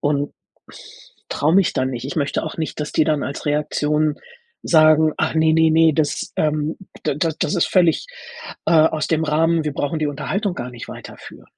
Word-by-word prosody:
und 145 0 -1 1.0
traue 155 +3 +1
mich 195 -1 +3
dann 130 0 0
nicht. 125 0 -5
Ich 145 - -6
möchte 145 -3 -1
auch 160 - -6
nicht, 160 -1 -4
dass 150 - -3
die 155 - +3
dann 150 -2 0
als 140 - -5
Reaktion 150 0 0 0.5
sagen: 155 -1 +4
„Ach 155 - 0
ne, 160 0 +3
ne, 160 0 +4
ne, 160 0 +4
das 150 -1 -1
ähm, 155 0 0 0.3
da - - -1
da 160 +3 0
das - - -1
ist 175 - +2
völlig, 175 - +2 0.6
äh, - - +2
aus 155 -1 +3
dem 160 -1 +1
Rahmen, 160 +2 +2
wir 150 -2 -3
brauchen 155 +3 -2
die 155 - 0
Unterhaltung 180 +7 -2
gar 125 -6 -6
nicht 120 -1 -10
weiterführen.“ - - -11
155 Hz, 190 wpm, -20 LUFS, 150-160 Hz, 1.0 s, sagen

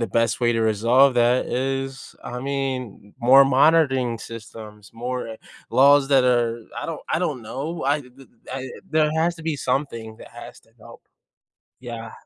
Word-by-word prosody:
the 115 - 0
best 115 +4 0
way 120 0 +2
to 115 - -1
resolve 115 +5 +3
that 120 +1 +2
is 135 0 -3
I 125 0 -6
mean, 130 -6 -4
more 135 +3 +7
monitoring 135 -4 +3
systems, 110 -2 -11
more, 125 +1 -4
uh, 110 - -8 0.3
laws 140 +1 +5
that 135 -2 +4
are 120 -2 +1
I - - -4
don't 165 -2 -5
I - - 0
don't 150 -9 -2
know, 135 +8 -5
I 145 +2 +1
th 125 -2 -15
th 135 -2 -16 0.2
I 130 -1 -5 0.2
there 155 -1 +2
has 170 +2 +1
to 165 - -11
be 160 -2 -2
something 120 -5 -3
that - - -12
has - - -11
to - - -29
help, - - -15 0.8
yeah. 115 -3 -8
130 Hz, 175 wpm, -22 LUFS, 115-140 Hz, 0.8 s, more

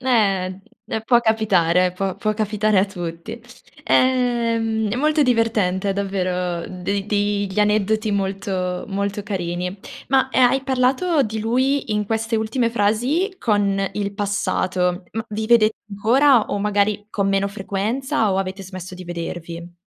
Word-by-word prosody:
eh, 195 -7 +1 0.4
può 240 +1 +4
capitare, 185 -6 +2
può 190 0 -3
può 215 +1 -1
capitare 215 -1 +1
a 190 - +4
tutti. 175 +1 -7 0.4
Ehm, 230 -4 +2
è 220 - -1
molto 305 +3 +2
divertente 210 -6 +1
davvero 180 -3 -2
de 195 +2 -3
dei 205 -1 0
gli 190 - -4
aneddoti 215 +1 +1
molto 190 -2 -2
molto 200 +1 -2
carini. 180 -2 -3 0.3
Ma, 265 0 +3
ehm, 250 -2 +5
hai 270 0 0
parlato 270 +5 +2
di 220 -2 -3
lui 255 +2 0
in 210 -1 -1
queste 225 +1 -1
ultime 230 +2 0
frasi 245 - +1
con 205 - +1
il 200 -1 -3
passato, 185 -3 -1
ma 225 +1 -3
vi 215 +1 -3
vedete 220 -2 +4
ancora 235 +4 +4
o 205 - -2
magari 205 0 0
con 200 -2 0
meno 195 0 +1
frequenza, 215 +4 -1
o 190 - 0
avete 195 +1 -3
smesso 185 -1 -8
di 180 0 -9
vedervi? 170 0 -6
205 Hz, 140 wpm, -21 LUFS, 190-230 Hz, 0.4 s, ehm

